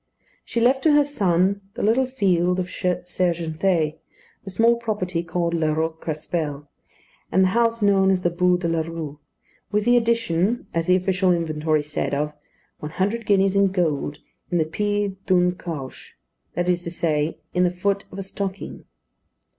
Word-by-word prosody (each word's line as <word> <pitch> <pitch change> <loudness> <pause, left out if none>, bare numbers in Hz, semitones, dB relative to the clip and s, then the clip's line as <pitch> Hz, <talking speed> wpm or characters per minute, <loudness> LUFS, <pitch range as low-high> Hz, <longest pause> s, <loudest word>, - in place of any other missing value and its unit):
She 235 - -2
left 255 +3 +3
to 310 0 +4
her 295 0 +6
son 195 -7 +1
the - - -3
little 240 +5 +3
field 185 -7 +1
of 180 - 0
Sergentée, 175 -2 -1 0.4
the 195 - -7
small 230 +5 +3
property 205 -7 -2
called 170 0 -2
La 160 -2 +1
Roque 160 +1 -2
Crespel, 150 -2 -3 0.6
and 190 - +4
the 185 - +4
house 230 +1 +1
known 195 -1 +4
as 185 -1 +1
the 175 - +2
Bû 180 +1 +2
de 175 - -1
la 165 -1 +1
Rue; 160 -3 -6 0.5
with 210 0 +1
the 240 0 +5
addition, 230 -3 +1
as 165 0 -1
the 180 - +5
official 185 0 +2
inventory 155 -2 0
said, 150 -1 -2
of 150 +1 -1 0.5
"one 150 +1 -7
hundred 205 +5 -1
guineas 195 -1 +3
in 200 0 +5
gold 160 -6 -1 0.3
in 175 - +1
the 160 - +2
pid 205 +2 -2
d'une 180 -1 +3
cauche," 155 -7 -8 0.4
that 175 0 0
is 175 -1 +2
to 170 - -5
say, 155 -2 -1 0.2
in 180 - +2
the 180 - +4
foot 195 +3 -1
of - - -9
a 195 - -3
stocking. 195 0 -5
180 Hz, 170 wpm, -23 LUFS, 165-200 Hz, 0.6 s, her